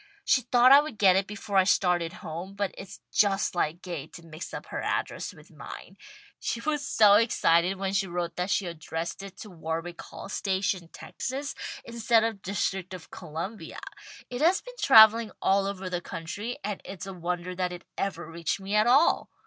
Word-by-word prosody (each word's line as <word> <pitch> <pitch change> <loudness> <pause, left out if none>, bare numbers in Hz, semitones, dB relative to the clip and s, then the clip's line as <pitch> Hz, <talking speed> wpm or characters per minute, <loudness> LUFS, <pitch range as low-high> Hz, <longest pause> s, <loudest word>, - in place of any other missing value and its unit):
She 255 - +4
thought 245 +1 +5
I 280 +1 +10
would 300 -7 -7
get 190 -3 +5
it 195 0 +1
before 205 -1 -3
I 190 - +7
started 180 -3 +2
home; 175 +5 -6
but 200 -1 -2
it's 195 - -10
just 200 -1 +2
like 170 0 -1
Gay 170 -6 -5
to 170 - -13
mix 160 +1 -8
up - - -6
her - - -2
address - - -2
with - - -17
mine. - - -10 0.4
She 235 - -2
was 295 +3 -1
so 215 -7 +5
excited 190 -5 +3
when 195 0 -2
she 195 -1 +1
wrote 175 -1 -3
that 180 +2 -2
she 200 - +1
addressed 165 +1 -5
it 195 -1 -10
to 210 - -10
Warwick 165 +1 -5
Hall - - -10
Station, 190 -2 -1
Texas, 270 - -5 0.3
instead 230 -1 +2
of 225 -3 -2
District 190 -1 -2
of 175 - -12
Columbia. 170 +8 -6 0.5
It 245 +2 -5
has 350 +5 +4
been - - -11
travelling 225 -2 +8
all 195 0 +2
over 195 -1 -4
the 180 -1 -2
country, 190 +8 -5
and 205 -1 -4
it's 195 0 -8
a 195 - -6
wonder 175 0 -3
that 180 0 -2
it 180 0 -8
ever 175 -4 -3
reached 170 +2 -3
me 195 +1 -5
at 210 +2 +4
all." 275 +7 +4
195 Hz, 190 wpm, -27 LUFS, 175-215 Hz, 0.5 s, I